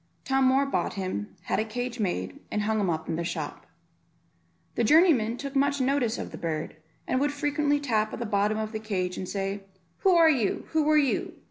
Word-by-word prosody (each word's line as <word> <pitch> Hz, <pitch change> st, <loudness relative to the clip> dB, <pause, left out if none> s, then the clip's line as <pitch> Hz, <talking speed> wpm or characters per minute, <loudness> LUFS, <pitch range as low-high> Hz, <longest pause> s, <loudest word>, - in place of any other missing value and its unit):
Tom 270 Hz, 0 st, +2 dB
Moor 265 Hz, +2 st, +4 dB
bought 275 Hz, -, -1 dB
him, 185 Hz, -, -4 dB
had -, -, -1 dB
a -, -, +2 dB
cage 245 Hz, +2 st, -4 dB
made, 95 Hz, -, -2 dB
and 210 Hz, -, -1 dB
hung 220 Hz, +1 st, +1 dB
him 195 Hz, -3 st, +1 dB
up 160 Hz, -1 st, -2 dB
in 160 Hz, -, -2 dB
the 170 Hz, -, -2 dB
shop. 170 Hz, -, -5 dB, 1.1 s
The 235 Hz, -, 0 dB
journeymen 255 Hz, -5 st, +4 dB
took 275 Hz, +1 st, -6 dB
much 280 Hz, +1 st, +2 dB
notice 260 Hz, -3 st, +1 dB
of -, -, -6 dB
the -, -, -8 dB
bird, 155 Hz, -2 st, -3 dB, 0.3 s
and 255 Hz, -, +1 dB
would 290 Hz, +1 st, +1 dB
frequently 290 Hz, 0 st, 0 dB
tap 220 Hz, -6 st, 0 dB
at -, -, -5 dB
the 235 Hz, -, -3 dB
bottom 210 Hz, 0 st, +1 dB
of 220 Hz, 0 st, -3 dB
the 220 Hz, -, -4 dB
cage, 185 Hz, -4 st, -2 dB
and 185 Hz, -, -5 dB
say, 195 Hz, 0 st, -3 dB, 0.4 s
"Who 375 Hz, -2 st, +4 dB
are 335 Hz, -1 st, +7 dB
you? 255 Hz, -10 st, +1 dB
Who 310 Hz, -1 st, +1 dB
are 305 Hz, -, +5 dB
you? 280 Hz, -3 st, +1 dB
230 Hz, 215 wpm, -27 LUFS, 200-280 Hz, 1.1 s, are